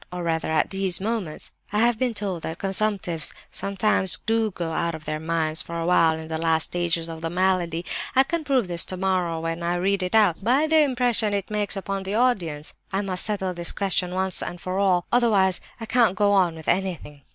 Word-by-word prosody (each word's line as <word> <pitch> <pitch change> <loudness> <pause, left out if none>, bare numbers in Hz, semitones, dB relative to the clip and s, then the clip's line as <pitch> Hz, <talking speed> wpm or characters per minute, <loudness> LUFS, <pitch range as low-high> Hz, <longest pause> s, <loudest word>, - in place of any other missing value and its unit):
or 180 -1 -5
rather 160 -1 -1
at 155 -1 +1
these 190 -2 +2
moments? 200 -6 -4 0.2
I 210 - -1
have 235 -1 +3
been 250 -3 0
told 195 -5 -2
that 160 +1 -5
consumptives 195 -4 -1 0.2
sometimes 195 -1 +2
do 225 0 +1
go 170 -4 -4
out 170 0 -1
of 155 -1 -11
their 155 0 -3
minds 160 0 0
for 170 -1 -6
a 165 - -2
while 165 -2 +3
in 160 0 -8
the 160 0 -3
last 160 -1 +2
stages 170 -1 -1
of 165 -1 -7
the 165 - -2
malady. 175 -1 0 0.3
I 265 - +6
can 330 +3 -3
prove 265 -8 +1
this 170 -1 0
tomorrow 185 -3 -1
when 165 +1 -3
I 170 +1 0
read 195 +2 +1
it 180 +3 -1
out, 200 -6 +3
by 260 +8 +3
the 315 0 +4
impression 245 -6 +2
it 200 +1 -4
makes 210 -1 -2
upon 195 0 -3
the 190 +2 -3
audience. 180 -12 0 0.2
I 195 +1 -1
must 185 -2 -1
settle 195 -3 -1
this 170 -1 -3
question 185 -2 0
once 190 -1 +2
and 175 - -5
for 185 +2 -3
all, 185 -3 +2
otherwise 205 -6 +3 0.2
I 225 - -5
can't 225 -4 +3
go 205 0 +2
on 185 -4 +3
with 160 -1 -11
anything.) 175 -6 -2
185 Hz, 215 wpm, -24 LUFS, 170-210 Hz, 0.3 s, I